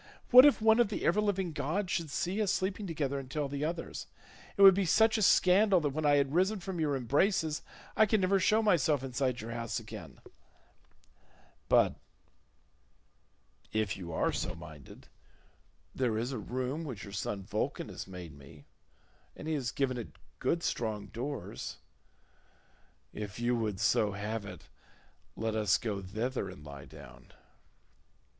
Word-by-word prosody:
What 255 Hz, +3 st, +11 dB
if 275 Hz, -6 st, +2 dB
one 220 Hz, +1 st, +5 dB
of 240 Hz, -, +5 dB
the 210 Hz, -, -3 dB
ever 195 Hz, +5 st, +3 dB
living 195 Hz, -4 st, 0 dB
gods 180 Hz, +7 st, -2 dB
should 165 Hz, -4 st, -1 dB
see 180 Hz, +8 st, -1 dB
us 200 Hz, -3 st, +1 dB
sleeping 195 Hz, +1 st, -2 dB
together, 140 Hz, -4 st, -2 dB
and 130 Hz, -2 st, -9 dB
tell 145 Hz, +1 st, -2 dB
the 140 Hz, +1 st, -4 dB
others? 165 Hz, +2 st, -4 dB, 0.5 s
It 200 Hz, -, +5 dB
would 195 Hz, -1 st, +11 dB
be 195 Hz, +2 st, +1 dB
such 220 Hz, +5 st, +4 dB
a 220 Hz, -, +1 dB
scandal 190 Hz, +1 st, +5 dB
that 150 Hz, -, 0 dB
when 155 Hz, +2 st, -1 dB
I 145 Hz, -, +5 dB
had 140 Hz, -1 st, +1 dB
risen 190 Hz, +5 st, +2 dB
from 185 Hz, -1 st, -5 dB
your 150 Hz, -3 st, +1 dB
embraces 150 Hz, -, +1 dB, 0.3 s
I 220 Hz, -, +5 dB
could 215 Hz, +1 st, +2 dB
never 195 Hz, +1 st, +2 dB
show 215 Hz, +4 st, +3 dB
myself 155 Hz, -9 st, +2 dB
inside 130 Hz, -2 st, -1 dB
your 115 Hz, +1 st, -7 dB
house 115 Hz, -3 st, -3 dB
again; -, -, -10 dB, 1.5 s
but -, -, +4 dB, 1.7 s
if 110 Hz, -2 st, 0 dB
you 85 Hz, -3 st, -7 dB
are 80 Hz, -, +1 dB
so -, -, -3 dB
minded, -, -, -12 dB, 0.9 s
there 120 Hz, -4 st, 0 dB
is 120 Hz, +4 st, -2 dB
a 130 Hz, -, -3 dB
room 130 Hz, +7 st, -3 dB
which 125 Hz, -10 st, -6 dB
your 100 Hz, -, -9 dB
son 100 Hz, -1 st, -3 dB
Vulcan -, -, -3 dB
has -, -, -7 dB
made 90 Hz, -4 st, -9 dB
me, 70 Hz, +1 st, -15 dB, 0.7 s
and 155 Hz, -, -8 dB
he 160 Hz, -, 0 dB
has 135 Hz, -5 st, -1 dB
given 130 Hz, -2 st, -1 dB
it 100 Hz, -11 st, -8 dB, 0.2 s
good 170 Hz, 0 st, 0 dB
strong 105 Hz, -3 st, -2 dB
doors; 130 Hz, +7 st, -5 dB, 1.4 s
if 105 Hz, +1 st, -6 dB
you 120 Hz, +1 st, +1 dB
would 110 Hz, -4 st, -2 dB
so 105 Hz, 0 st, +2 dB
have 105 Hz, +1 st, -4 dB
it, -, -, -10 dB, 0.7 s
let 110 Hz, 0 st, -2 dB
us 105 Hz, -4 st, +2 dB
go 105 Hz, -4 st, -3 dB
thither 110 Hz, +7 st, -3 dB
and 75 Hz, -, -12 dB
lie 70 Hz, -1 st, -9 dB
down." 70 Hz, -5 st, -14 dB
140 Hz, 165 wpm, -31 LUFS, 110-185 Hz, 1.7 s, What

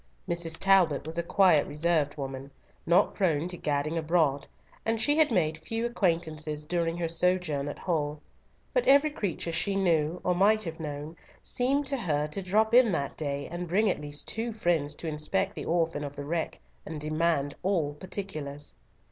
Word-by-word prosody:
Mrs. 170 Hz, -1 st, -1 dB
Talbot 185 Hz, -8 st, +3 dB
was 160 Hz, +2 st, -4 dB
a -, -, +3 dB
quiet, 170 Hz, -3 st, +4 dB
reserved 150 Hz, -1 st, 0 dB
woman, 135 Hz, -1 st, -5 dB, 0.4 s
not 175 Hz, +4 st, +4 dB
prone 165 Hz, -4 st, +1 dB
to 180 Hz, -, -5 dB
gadding 150 Hz, +1 st, -1 dB
abroad, 155 Hz, -4 st, +1 dB, 0.4 s
and 225 Hz, 0 st, 0 dB
she 290 Hz, +6 st, +3 dB
had 315 Hz, -1 st, +5 dB
made 160 Hz, -6 st, +1 dB
few 225 Hz, +7 st, -3 dB
acquaintances 160 Hz, -8 st, -1 dB
during 170 Hz, 0 st, -1 dB
her 170 Hz, -1 st, -1 dB
sojourn 165 Hz, -4 st, 0 dB
at 145 Hz, -, -5 dB
Hull; 150 Hz, -4 st, -2 dB, 0.5 s
but -, -, +1 dB
every 285 Hz, +3 st, +6 dB
creature 180 Hz, -, -3 dB
she 180 Hz, +4 st, 0 dB
knew, 170 Hz, -3 st, +1 dB
or 180 Hz, -, +2 dB
might 210 Hz, +4 st, +3 dB
have 165 Hz, -1 st, -6 dB
known, 150 Hz, +1 st, -6 dB, 0.3 s
seemed 275 Hz, +4 st, +1 dB
to 275 Hz, 0 st, -1 dB
her 150 Hz, -, 0 dB
to 175 Hz, +6 st, -4 dB
drop 215 Hz, +4 st, +2 dB
in 245 Hz, -3 st, +6 dB
that 140 Hz, -3 st, -2 dB
day, 140 Hz, -2 st, -3 dB
and 175 Hz, +1 st, -4 dB
bring 200 Hz, +4 st, +3 dB
at -, -, -4 dB
least 145 Hz, 0 st, -5 dB
two 230 Hz, +1 st, -2 dB
friends 170 Hz, -9 st, 0 dB
to 165 Hz, -, -6 dB
inspect 160 Hz, +6 st, 0 dB
the -, -, -6 dB
orphan 165 Hz, -3 st, 0 dB
of 145 Hz, 0 st, -6 dB
the 145 Hz, 0 st, -6 dB
wreck, 165 Hz, +2 st, -2 dB, 0.2 s
and 155 Hz, -1 st, -6 dB
demand 155 Hz, -1 st, 0 dB
all 175 Hz, -6 st, 0 dB
particulars. 150 Hz, -, -6 dB
165 Hz, 180 wpm, -28 LUFS, 150-195 Hz, 0.5 s, every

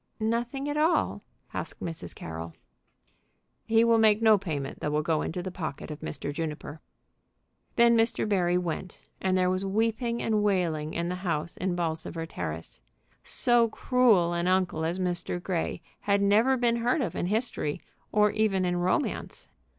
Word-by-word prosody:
"Nothing 235 Hz, +5 st, -1 dB
at 290 Hz, 0 st, -2 dB
all?" 320 Hz, +3 st, +2 dB, 0.3 s
asked -, -, -4 dB
Mrs. 165 Hz, -, -6 dB
Carroll. 80 Hz, 0 st, -7 dB, 1.1 s
"He 225 Hz, 0 st, +4 dB
will 230 Hz, -1 st, +4 dB
make 215 Hz, -1 st, +5 dB
no 220 Hz, -1 st, +6 dB
payment 155 Hz, -9 st, -4 dB
that 150 Hz, -, -2 dB
will 150 Hz, +1 st, +1 dB
go 155 Hz, -1 st, +1 dB
into 175 Hz, +2 st, -3 dB
the 185 Hz, -, -4 dB
pocket 160 Hz, -4 st, -5 dB
of 150 Hz, -, -7 dB
Mr. 145 Hz, -1 st, -5 dB
Juniper." 155 Hz, -1 st, -5 dB, 0.9 s
Then 235 Hz, 0 st, +5 dB
Mr. 230 Hz, 0 st, +2 dB
Barry 180 Hz, -4 st, +2 dB
went, 180 Hz, +1 st, -4 dB, 0.2 s
and 185 Hz, -1 st, +2 dB
there 185 Hz, 0 st, +2 dB
was 185 Hz, +1 st, -1 dB
weeping 225 Hz, +4 st, 0 dB
and 215 Hz, -2 st, +1 dB
wailing 170 Hz, -7 st, 0 dB
in 170 Hz, +1 st, -1 dB
the -, -, -1 dB
house 170 Hz, -3 st, -2 dB
in 185 Hz, -1 st, -2 dB
Bolsover 165 Hz, -1 st, -2 dB
Terrace. 80 Hz, -, -6 dB, 0.4 s
So 240 Hz, -2 st, +4 dB
cruel 215 Hz, -9 st, +3 dB
an 170 Hz, +1 st, -1 dB
uncle 185 Hz, -4 st, +1 dB
as 170 Hz, +3 st, -1 dB
Mr. 180 Hz, -1 st, -2 dB
Grey 175 Hz, -2 st, -3 dB, 0.2 s
had 200 Hz, 0 st, +1 dB
never 215 Hz, +7 st, +4 dB
been 235 Hz, -1 st, +2 dB
heard 245 Hz, +6 st, +1 dB
of 245 Hz, -, -2 dB
in 175 Hz, -, -1 dB
history, 210 Hz, -8 st, -1 dB, 0.3 s
or 210 Hz, 0 st, +4 dB
even 200 Hz, -4 st, +1 dB
in 175 Hz, 0 st, 0 dB
romance. 185 Hz, +11 st, -2 dB
185 Hz, 165 wpm, -28 LUFS, 165-225 Hz, 1.1 s, no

